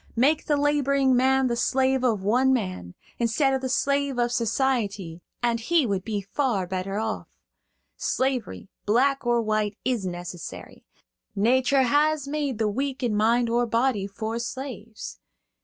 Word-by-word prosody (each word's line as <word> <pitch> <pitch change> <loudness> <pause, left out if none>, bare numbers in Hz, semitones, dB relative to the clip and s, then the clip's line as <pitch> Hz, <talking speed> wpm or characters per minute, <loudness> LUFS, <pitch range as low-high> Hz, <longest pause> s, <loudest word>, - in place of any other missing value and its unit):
Make 285 +7 +2
the 295 - +2
laboring 280 -2 +2
man 265 +1 +3
the 240 -2 0
slave 265 +2 +1
of 220 -6 +1
one 250 +6 +3
man, 185 - -2 0.2
instead 240 +4 +2
of 265 - 0
the 260 - -2
slave 280 0 0
of 240 0 +1
society, 215 -8 -1 0.2
and 235 -1 +1
he 310 +5 +2
would 195 -4 -1
be 210 -2 -2
far 205 -1 -1
better 190 +2 -3
off. 220 0 -3 0.7
Slavery, 260 -6 -2 0.2
black 265 +4 +2
or 240 -1 +2
white, 215 -1 -1
is 245 -5 0
necessary. 175 -1 -7 0.5
Nature 260 +6 +3
has 290 +2 +2
made 285 -4 -2
the 220 -1 +1
weak 265 +5 -2
in 230 -4 +1
mind 230 +3 +3
or 240 +1 +1
body 230 -3 +1
for 220 +3 -4
slaves. 235 -3 -7
240 Hz, 150 wpm, -25 LUFS, 215-265 Hz, 0.7 s, man